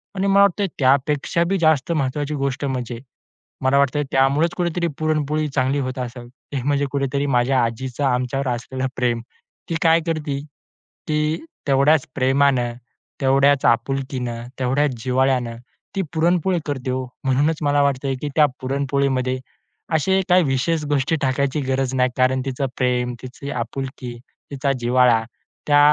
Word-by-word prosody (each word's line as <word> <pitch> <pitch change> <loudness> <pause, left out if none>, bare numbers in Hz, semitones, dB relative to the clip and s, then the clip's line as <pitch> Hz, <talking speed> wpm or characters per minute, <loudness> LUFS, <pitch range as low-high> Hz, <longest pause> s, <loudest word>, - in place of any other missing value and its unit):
आणि 195 +1 0
मला 195 0 +5
वाटतंय, 200 0 +2
त्यापेक्षा 140 +5 +2
बी 195 - +2
जास्त 155 -2 +2
महत्त्वाची 150 -1 -1
गोष्ट 140 +1 -1
म्हणजे 125 -3 -3 0.6
मला 130 +1 +3
वाटतंय, 140 +1 +2
त्यामुळेच 140 +5 +3
कुठेतरी 175 0 0
पुरणपोळी 155 -1 0
चांगली 135 +1 0
होत 130 -1 -3
असेल, 120 -1 -6
ते 135 +1 -7
म्हणजे 145 0 +1
कुठेतरी 140 0 -1
माझ्या 125 0 +2
आजीचं 125 +4 -4
आमच्यावर 130 +1 0
असलेलं 130 +2 -4
प्रेम. 120 -2 0 0.5
ती 165 - -1
काय 165 0 +5
करती, 150 -4 -2 0.7
ती 150 - 0 0.2
तेवढ्याच 140 +2 +4
प्रेमानं, 130 -2 +2 0.5
तेवढ्याच 135 +1 +4
आपुलकीनं, 125 -1 0 0.2
तेवढ्याच 135 +3 +1
जिव्हाळ्यानं 130 -2 +1 0.4
ती 195 - +1
पुरणपोळी 175 +2 +2
करते 130 -3 -3
हो. 130 0 -2 0.2
म्हणूनच 145 +4 +2
मला 145 0 +3
वाटतंय, 135 -1 0
की 150 - -2
त्या 150 -2 +6 0.2
पुरणपोळीमध्ये 135 -1 0 0.6
असे 190 +5 +2
काही 180 0 +5
विशेष 150 +4 0
गोष्टी 145 +2 +1
टाकायची 140 +2 0
गरज 130 0 0
नाही. 125 0 +3
कारण 130 0 +2
तिचं 135 +1 -2
प्रेम, 125 -1 0
तिची 140 +3 -7
आपुलकी, 130 0 -5 0.4
तिचा 140 0 0
जिव्हाळा 120 -1 +3 0.4
त्या 145 -1 +5
135 Hz, 140 wpm, -21 LUFS, 130-150 Hz, 0.7 s, त्या